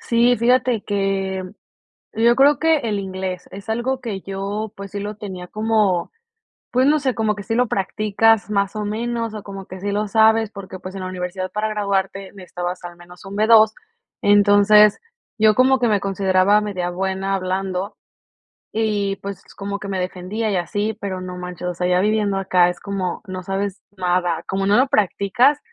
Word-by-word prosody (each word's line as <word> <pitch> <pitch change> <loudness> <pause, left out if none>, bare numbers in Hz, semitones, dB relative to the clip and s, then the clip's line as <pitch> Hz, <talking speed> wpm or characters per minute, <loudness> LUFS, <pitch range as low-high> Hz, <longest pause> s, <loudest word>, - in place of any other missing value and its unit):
Sí, 240 +1 +3
fíjate 245 -1 +2
que 195 -2 -1 0.7
yo 235 +2 +3
creo 285 +2 +5
que 320 -1 +3
el 215 -6 -2
inglés 190 -1 -5
es 200 +3 -10
algo 240 +4 -1
que 215 -5 -5
yo, 200 +3 -4
pues, 200 0 -8
sí 205 - -4
lo 205 +1 -5
tenía 190 -4 -7
como, 215 -5 +1 0.6
pues, 255 +2 +3
no 305 +1 +4
sé, 265 -3 -1
como 220 -2 0
que 205 - -7
sí 225 +2 -3
lo 250 +1 +3
practicas 215 +2 +1
más 200 0 0
o 210 - -2
menos, 230 +1 -3
o 210 - -6
como 195 -1 -9
que 185 0 -9
sí 200 0 -2
lo 210 +1 -1
sabes, 220 0 +4
porque, 195 -2 -9
pues, 185 +1 -9
en 195 - -6
la 185 - -4
universidad 185 0 -4
para 215 +1 -1
graduarte 195 -2 -2
necesitabas 180 -1 -6
al 175 0 -8
menos 175 +1 -15
un 195 +1 -7
B2. 220 0 +6 0.5
Entonces, 205 +1 +6 0.4
yo 215 -1 +5
como 260 +2 +4
que 245 - +1
me 205 -2 +2
consideraba 195 +1 +2
media 185 -4 -3
buena 190 +2 -2
hablando 190 +1 -2 0.8
y, 205 -3 0
pues, 200 -1 -7
como 200 0 -4
que 205 - -7
me 190 -1 -2
defendía 185 +5 -3
y 195 - 0
así, 205 +5 -2
pero 190 -2 -4
no 180 0 -6
manches, 180 0 -6
o 175 - -3
sea, 180 +1 -2
ya 180 0 +3
viviendo 210 -1 +1
acá 180 -2 +3
es 180 - -5
como, 195 -3 -3
no 185 -1 -6
sabes 195 +1 -3
nada, 175 -2 0
como 195 0 -1
no 205 +1 +4
lo 260 +2 +4
practicas, 235 - +2
200 Hz, 185 wpm, -21 LUFS, 185-220 Hz, 0.8 s, B2